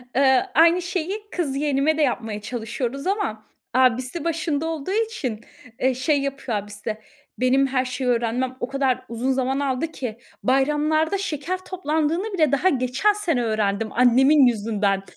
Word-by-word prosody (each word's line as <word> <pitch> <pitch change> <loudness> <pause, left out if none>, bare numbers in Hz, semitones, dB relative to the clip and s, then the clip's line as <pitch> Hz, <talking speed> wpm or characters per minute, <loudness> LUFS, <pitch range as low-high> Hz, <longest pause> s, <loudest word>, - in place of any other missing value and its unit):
Iıı, 265 -1 +4
aynı 335 +4 +5
şeyi 360 +3 -3
kız 300 -7 -2
yeğenime 290 +1 +1
de - - +1
yapmaya 225 -6 -1
çalışıyoruz 245 - -4
ama 380 - -1 0.3
abisi 255 +4 +2
başında 320 -2 -1
olduğu 325 +2 -4
için, 415 - -2 0.4
eee, 260 +1 +2
şey 275 +3 +1
yapıyor. 275 -5 -3
Abisi, 205 +1 -5 0.4
"Benim 265 +2 +3
her 260 -1 0
şeyi 250 +1 -3
öğrenmem 245 +2 0
o 245 - -2
kadar 270 -2 0
uzun 240 +3 -1
zaman 265 +1 0
aldı 275 +2 -1
ki 235 -7 -5 0.3
bayramlarda 300 +6 +2
şeker 350 -1 -3
toplandığını 335 +3 -1
bile 310 -7 +2
daha 285 +7 +3
geçen 260 +9 +1
sene 335 -12 0
öğrendim 215 -1 0
annemin 260 +4 +5
yüzünden." 205 -4 0
270 Hz, 145 wpm, -23 LUFS, 245-315 Hz, 0.4 s, aynı